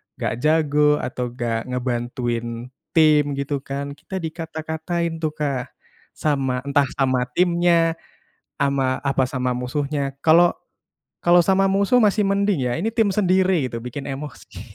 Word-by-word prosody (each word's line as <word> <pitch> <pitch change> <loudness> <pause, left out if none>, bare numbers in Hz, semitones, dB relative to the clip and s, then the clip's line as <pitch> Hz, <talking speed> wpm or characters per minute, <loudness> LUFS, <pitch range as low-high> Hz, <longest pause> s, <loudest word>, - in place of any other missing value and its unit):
gak - - -2
jago 150 -1 +3
atau 125 0 -3
gak 115 -1 -2
ngebantuin 120 -1 -3 0.2
tim 155 -2 +5
gitu 140 +1 -2
kan, 140 +1 -5
kita 155 +6 -9
dikata-katain 160 +1 -4
tuh, 155 -1 -2
Kak, 140 -4 -3 0.4
sama 135 -4 -1
entah 140 0 +2
sama 130 -3 +1
timnya, 170 -2 +2 0.6
sama 135 -2 +1
apa 135 -1 +2
sama 130 -1 -1
musuhnya, 140 +2 -3
kalau 170 +2 +6 0.7
kalau 175 0 +5
sama 195 +1 +3
musuh 200 +6 +3
masih 210 -1 +3
mending 195 -7 +1
ya, 120 - 0
ini 200 - -1
tim 225 -3 +1
sendiri 185 -6 +2
gitu 115 - -5
bikin 130 +3 -6
emosi. 135 -8 -8
145 Hz, 135 wpm, -22 LUFS, 130-170 Hz, 0.7 s, kalau